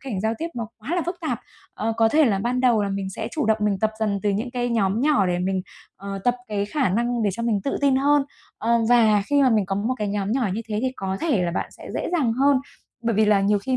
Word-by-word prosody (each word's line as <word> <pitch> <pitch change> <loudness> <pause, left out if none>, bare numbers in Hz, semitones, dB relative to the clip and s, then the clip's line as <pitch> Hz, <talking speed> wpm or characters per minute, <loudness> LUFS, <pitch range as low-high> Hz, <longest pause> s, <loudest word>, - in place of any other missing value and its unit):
cảnh 240 -9 -4
giao 220 +2 0
tiếp 335 - -3
nó 225 -2 -4
quá 255 +11 -4
là 355 - +1
phức 350 0 -3
tạp, 320 - -2 0.3
ờ, 225 +1 -1
có 225 0 +4
thể 305 +6 +4
là 205 -6 +2
ban 245 +5 -1
đầu 240 -4 +3
là 200 - -1
mình 195 -1 -3
sẽ 220 +4 -5
chủ 305 - -2
động 220 0 +3
mình 205 -2 +1
tập 220 +1 +1
dần 205 -2 0
từ 205 - +2
những 220 +5 -2
cái 245 -1 -2
nhóm 215 -2 +1
nhỏ, 285 -8 +3
để 175 -1 0
mình, 185 +1 -1 0.3
ờ, 195 0 -6
tập 245 0 +3
cái 205 -1 -1
khả 270 +1 0
năng 235 +4 0
để 205 - +2
cho 235 - -5
mình 220 -4 +1
tự 275 - -1
tin 275 -2 +3
hơn. 285 +1 +3 0.4
Ờ, 235 +1 +2
và 220 -4 +5
khi 285 +3 +3
mà 260 - +4
mình 215 -5 +2
có 195 - -2
một 220 +6 -1
cái 210 - -1
nhóm 200 0 -1
nhỏ 245 -4 +1
như 225 - -2
thế 210 -1 -2
thì 260 0 0
có 190 0 -3
thể 265 - +1
là 175 - 0
bạn 170 - -3
sẽ - - -12
dễ - - -2
dàng 275 -10 +2
hơn, 275 +3 +3 0.5
bởi 230 -1 0
vì 215 +1 +4
là 210 -1 +4
nhiều 205 +1 +2
khi 255 +5 -1
225 Hz, 290 wpm, -23 LUFS, 200-255 Hz, 0.5 s, và